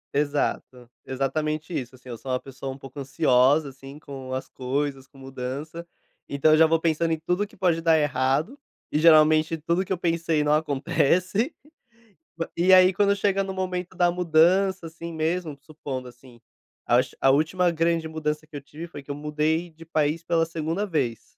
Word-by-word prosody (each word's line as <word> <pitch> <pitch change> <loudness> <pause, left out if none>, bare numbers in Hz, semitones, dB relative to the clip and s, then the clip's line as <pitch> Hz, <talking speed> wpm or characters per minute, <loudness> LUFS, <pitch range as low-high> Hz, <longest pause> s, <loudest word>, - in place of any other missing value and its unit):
Exato 140 -4 -1 0.2
exatamente 155 +5 -2
isso 125 0 -4
assim, 130 0 -15
eu 120 - -6
sou 130 - -6
uma 125 - 0
pessoa 135 0 -7
um 130 - -9
pouco 135 +1 -11
ansiosa, 135 +2 +3
assim, 135 +1 -12
com 135 -3 -9
as 130 0 -4
coisas, 135 +1 -3
com 135 - -21
mudança. 135 +6 -7 0.4
Então, 140 +2 +2
eu 155 - +6
já 160 0 +6
vou 165 0 +2
pensando 165 0 0
em 160 - -3
tudo 180 +5 -1
que 220 +1 -21
pode 175 -3 +1
dar 165 -1 +4
errado, 150 - 0 0.3
e 150 - +1
geralmente 155 0 +5
tudo 170 +4 0
que 190 - -11
eu 190 - +1
pensei 165 -2 0
não 150 0 +2
acontece. 170 - +1 0.8
Ma 165 - -4
e 180 +2 +5
aí, 185 0 +7
quando 200 +2 +2
chega 195 -1 +1
no 190 0 -5
momento 185 -1 -4
da 175 -1 +3
mudança, 175 +2 +2
assim 165 +1 -8
mesmo, 160 0 -2
supondo 140 -5 -7
assim, 120 -1 -16 0.5
acho 125 +2 +2
a 135 - +5
última 160 +6 +2
grande 165 0 0
mudança 155 -1 -3
que 155 - -13
eu 145 - -5
tive 155 +4 -9
foi 145 -4 -10
que 145 - -7
eu - - -4
mudei 150 +3 -1
de 165 0 -15
país 155 0 0
pela 165 -1 +1
2ª 165 +5 -3
vez. 125 - -3
155 Hz, 185 wpm, -25 LUFS, 135-170 Hz, 0.8 s, aí